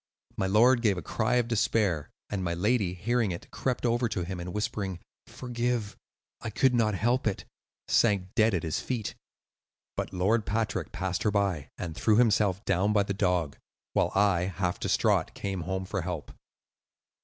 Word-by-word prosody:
My 95 - 0
lord 120 +5 +5
gave 105 -5 +2
a 90 - -5
cry 125 - 0
of 120 -2 +2
despair, 100 -7 +1 0.2
and 100 -3 -3
my 85 -1 -1
lady, 100 -1 +1
hearing 115 +4 0
it, 85 -1 -6
crept 125 -1 -2
over 120 0 +2
to 100 -4 -2
him 90 +1 -5
and 90 +1 -5
whispering, 100 -2 -3 0.3
'Forgive; 120 -3 -2 0.5
I - - -4
could 130 +4 +2
not 110 -4 +2
help 120 +5 +1
it,' 100 - -2 0.4
sank 100 -4 +2
dead 110 -2 +3
at 85 - -2
his 80 -2 -1
feet. 120 -5 -3 0.8
But - - -3
Lord 105 +5 +2
Patrick 110 +1 -1
passed 95 -1 -2
her 105 - +2
by, 95 -9 0
and 85 - -4
threw 110 +4 +3
himself 105 -4 +3
down 100 +3 +2
by 105 -1 +4
the 100 - -2
dog; 90 -7 0 0.3
while - - +2
I, 95 -3 +3
half 90 -1 -2
distraught, - - +1
came 95 -2 -3
home 95 0 -2
for 100 0 -2
help." 85 -3 -5
100 Hz, 175 wpm, -28 LUFS, 90-115 Hz, 0.8 s, lord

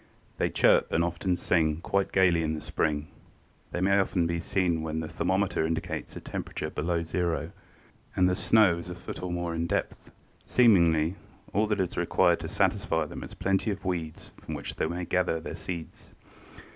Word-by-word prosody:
They - - +2
chirp - - +4
and 85 - +2
often 85 +2 -1
sing 80 -3 +1
quite 100 +2 0
gaily 90 -3 +4
in 80 0 -1
the 75 - -6
spring. 75 -1 -1 0.6
They 90 - -3
may 100 +1 +4
often 95 -2 +1
be 85 0 -1
seen 85 -2 0
when 80 0 -3
the 80 - -4
thermometer 95 +1 0
indicates 80 0 -3
a - - -5
temperature 75 - -5
below 85 +2 -1
zero 85 -2 -1 0.6
and 90 - +4
the 90 - +2
snow 100 -3 +4
is 85 - -8
a 90 - -5
foot 85 - -8
or 90 -1 -3
more 85 -1 -2
in 85 +1 -1
depth. - - -3 0.3
Seemingly 85 -7 +4 0.4
all 105 +3 +2
that 105 -1 0
is 90 -2 -1
required - - +3
to - - -5
satisfy 80 -1 +1
them - - -7
is - - -9
a - - -11
plenty 95 +3 0
of 100 -1 -4
weeds 85 -4 -4
from - - -6
which - - -5
they - - 0
may 90 +1 -3
gather 90 -2 +1
the - - -7
seeds. 85 -3 -7
85 Hz, 190 wpm, -28 LUFS, 80-95 Hz, 0.6 s, chirp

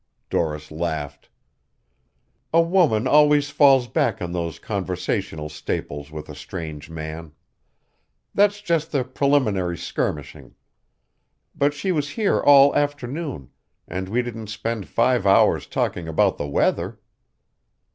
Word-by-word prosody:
Doris 75 -2 -2
laughed. 80 -3 -4 1.2
"A 165 - +4
woman 165 - +3
always 145 0 +4
falls 135 -4 +5
back 115 -3 0
on 85 -1 -4
those 85 -3 -3
conversational 90 -5 -3
staples 75 -1 -5
with 75 -1 -7
a 75 - -9
strange 75 +1 -7
man. 80 -1 -7 1.0
That's 205 0 +3
just 165 -4 -1
the 140 -4 +1
preliminary 125 -10 +1
skirmishing. 75 -2 -4 1.0
But 145 +1 +1
she 185 +7 -1
was 150 -4 -1
here 210 +4 +1
all 140 0 +7
afternoon, 145 - -3 0.4
and 95 +2 -5
we 120 +4 +1
didn't 115 -3 -7
spend 110 -1 -4
five 120 -3 +2
hours 95 - +4
talking 85 -2 -2
about 80 - +1
the 70 - -2
weather." 70 - 0
110 Hz, 120 wpm, -23 LUFS, -, 1.2 s, all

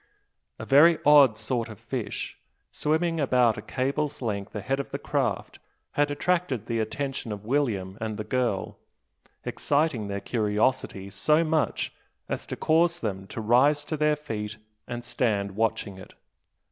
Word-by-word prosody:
A - - -7
very 155 +5 +6
odd 140 -6 +7
sort 115 +1 -2
of 110 - -10
fish, - - -5 0.3
swimming 165 +2 0
about 125 -5 +3
a 105 - -6
cable's 140 +5 -2
length 105 -4 -3
ahead 130 +7 -1
of 140 - -4
the - - -3
craft, - - -2 0.3
had 145 0 +2
attracted 145 - 0
the 115 0 -1
attention 130 +2 -3
of 105 0 -6
William 110 -7 -1
and 110 -1 -3
the 110 - -3
girl, 120 -5 -1 0.7
exciting 145 -7 0
their 100 0 -3
curiosity 105 -2 0
so 150 - +3
much 155 -1 0 0.3
as - - -4
to - - -4
cause 170 +2 +3
them 95 - -4
to 115 - -5
rise 140 +7 +4
to 155 - -2
their 150 0 +2
feet 110 -7 -5 0.3
and 120 -1 -5
stand 110 -5 0
watching 110 -2 -1
it. - - -13
125 Hz, 150 wpm, -27 LUFS, 105-145 Hz, 0.7 s, odd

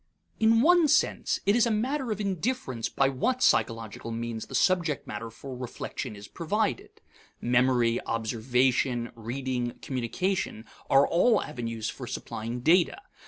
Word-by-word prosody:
In 225 +1 +5
one 345 +2 +5
sense, 300 - +2
it 200 - +4
is 240 0 +4
a - - +1
matter 255 +5 -1
of 215 -2 -2
indifference 195 - -2
by 135 - +2
what 250 - 0
psychological 115 - +1
means 115 -1 -4
the 135 - -6
subject 170 0 +2
matter 115 +2 -6
for 130 +4 -9
reflection 125 -3 -6
is 100 0 -10
provided. 220 - -2 0.4
Memory, 120 -1 +2
observation, 120 +2 0
reading, 120 +1 -3
communication, 130 - -2 0.2
are 135 +1 +6
all 210 +6 +3
avenues 115 -6 -4
for - - -8
supplying 115 +3 -5
data. 170 - +4
130 Hz, 135 wpm, -28 LUFS, -, 0.4 s, are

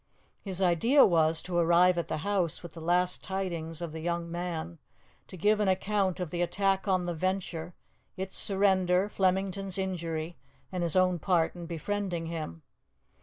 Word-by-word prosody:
His 195 -1 -2
idea 230 - +5
was 160 -2 +2
to 180 - -5
arrive 175 +2 +5
at 170 -2 -2
the 155 - -2
house 190 -6 0
with 170 - -9
the 165 - -9
last 180 +2 +1
tidings 175 -4 -3
of 170 - -4
the 160 - -6
young 170 0 -3
man; 170 -1 -4 0.5
to 185 - -10
give 210 +5 +3
an 210 - +1
account 190 0 +1
of 180 -4 -4
the 175 - -2
attack 195 +2 0
on 185 -2 +2
the 175 - -2
Venture, 175 -1 -3 0.4
its 190 0 -4
surrender, 190 -1 +3
Flemington's 195 0 0
injury, 170 -3 -3 0.3
and 180 -1 -3
his 170 0 0
own 185 -1 +3
part 170 -2 +1
in 170 -1 -7
befriending 175 +1 -3
him. 155 - -6
180 Hz, 170 wpm, -29 LUFS, 170-190 Hz, 0.5 s, idea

